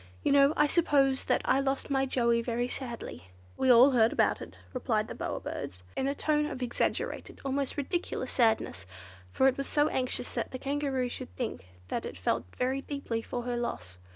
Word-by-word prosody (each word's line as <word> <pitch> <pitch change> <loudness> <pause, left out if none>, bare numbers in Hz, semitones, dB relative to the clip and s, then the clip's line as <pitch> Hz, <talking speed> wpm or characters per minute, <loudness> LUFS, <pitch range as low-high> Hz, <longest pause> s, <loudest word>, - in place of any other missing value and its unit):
You - - +2
know, 280 +1 +6
I 300 - +5
suppose, 280 -4 +3
that - - +1
I 270 - +3
lost 275 +1 -1
my 270 0 +2
Joey 235 -2 +2
very 240 +1 -1
sadly." 235 - -6 0.3
"We 265 - 0
heard 250 - +8
all 255 +3 +7
about 225 0 +3
it," - - -9 0.2
replied 220 -4 0
the - - -6
Bower - - -3
Bird - - -5 0.2
in 265 - 0
a 280 - 0
tone 300 0 +1
of 255 -4 -4
exaggerated, 240 - -2
almost 275 +1 -1
ridiculous 340 +5 -2
sadness, 220 - +1 0.4
for 265 - +4
it 265 0 +1
was 275 - -2
so 295 0 +2
anxious 255 -1 -2
that - - -2
the 255 - -5
Kangaroo 275 -2 -1
should 250 +1 -6
think 225 - -4 0.2
that - - -2
it - - -8
felt - - 0
very 260 +2 0
deeply 275 -6 -3
for 245 +1 -4
her 245 0 -2
loss. 90 - -4
260 Hz, 195 wpm, -30 LUFS, 235-275 Hz, 0.4 s, heard